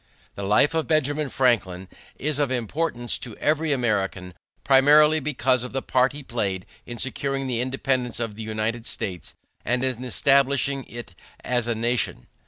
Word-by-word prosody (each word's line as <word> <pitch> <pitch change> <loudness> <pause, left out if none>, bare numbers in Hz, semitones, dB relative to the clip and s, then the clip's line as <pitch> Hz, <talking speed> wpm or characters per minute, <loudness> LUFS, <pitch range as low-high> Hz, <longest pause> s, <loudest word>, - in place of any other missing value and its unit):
The - - -7
life 105 +10 +3
of 160 -1 -1
Benjamin 150 -1 +1
Franklin 100 -9 +1 0.3
is 150 0 -1
of 145 -3 +1
importance 120 +1 -2
to 115 - -7
every 155 +1 +1
American 100 -8 -1 0.3
primarily 150 +3 +6
because 130 -4 +1
of 125 - -7
the 135 - -2
part 130 0 +2
he 145 0 -9
played 100 -7 -2 0.2
in 120 - -6
securing 135 +2 -2
the 125 -2 -1
independence 130 -2 -1
of 115 -3 -3
the 110 - -9
United 110 +2 -3
States 90 -2 -5 0.3
and 125 +2 0
in 130 -2 -2
establishing 135 +1 +2
it 120 -6 -9 0.3
as 120 -2 0
a 120 - 0
nation. 120 - -1
125 Hz, 160 wpm, -24 LUFS, 115-140 Hz, 0.3 s, primarily